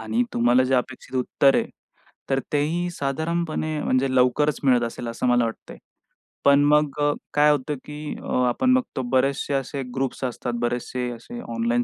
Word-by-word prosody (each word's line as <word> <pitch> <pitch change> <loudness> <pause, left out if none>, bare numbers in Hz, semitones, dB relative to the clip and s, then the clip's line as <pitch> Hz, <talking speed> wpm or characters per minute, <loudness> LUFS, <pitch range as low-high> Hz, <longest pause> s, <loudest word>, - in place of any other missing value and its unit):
आणि 110 +2 0
तुम्हाला 120 +2 +4
जे 130 +1 +1
अपेक्षित 125 +1 -3
उत्तर 135 +2 +3
आहे, - - +1 0.6
तर 135 - +2
तेही 160 +5 0
साधारणपणे 155 +1 -2
म्हणजे 130 0 +1
लवकरच 130 +4 +3
मिळत 125 -3 +4
असेल, 115 +1 -6
असं 115 +2 -3
मला 120 -1 +4
वाटतंय. 115 -1 -6 0.7
पण 140 0 +6
मग 150 0 +2
अ, 145 - +3 0.2
काय 150 0 +5
होतं, 145 +1 -1
की 150 0 -6
अ, - - -6 0.2
आपण 255 - +2
बघतो 255 - 0
बरेचसे 135 +2 +1
असे 135 +1 -2
ग्रुप्स 135 0 -2
असतात, 120 -1 -3
बरेचसे 125 +1 -2
असे 180 - -9 0.2
ऑनलाईन 240 +1 +1
135 Hz, 160 wpm, -24 LUFS, 125-150 Hz, 0.7 s, पण